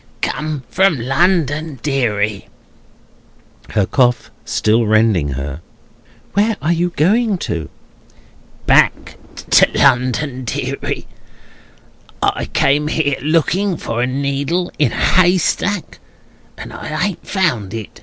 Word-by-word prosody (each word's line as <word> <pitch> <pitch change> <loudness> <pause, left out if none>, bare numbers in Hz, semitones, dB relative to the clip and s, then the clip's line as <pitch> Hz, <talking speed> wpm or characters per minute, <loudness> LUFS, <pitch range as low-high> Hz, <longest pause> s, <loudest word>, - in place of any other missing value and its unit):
"Come 150 -3 -2
from 185 -7 +2
London, 155 +1 0
deary." 110 -8 -1 1.2
(Her 105 -3 +1
cough 125 +1 +1
still 110 +1 +1
rending 105 -10 +2
her.) 70 +3 -5 0.7
"Where 210 +2 +1
are 155 +5 +1
you 175 +1 0
going 210 +6 +2
to?" 80 - -4 1.0
"Back - - +2 0.3
to - - +6
London, 130 +1 +2
deary. 115 - -3 1.1
I - - 0
came 145 +2 +1
here, 150 -3 0
looking 170 +5 +1
for 115 -4 -3
a 125 - +1
needle 140 +6 -1
in 145 -6 +3
a - - -5
haystack, 185 +1 +1 0.6
and - - -9
I 155 +3 -3
ain't 185 - -10
found 140 - 0
it. 110 -3 -8
140 Hz, 110 wpm, -17 LUFS, 115-175 Hz, 1.2 s, to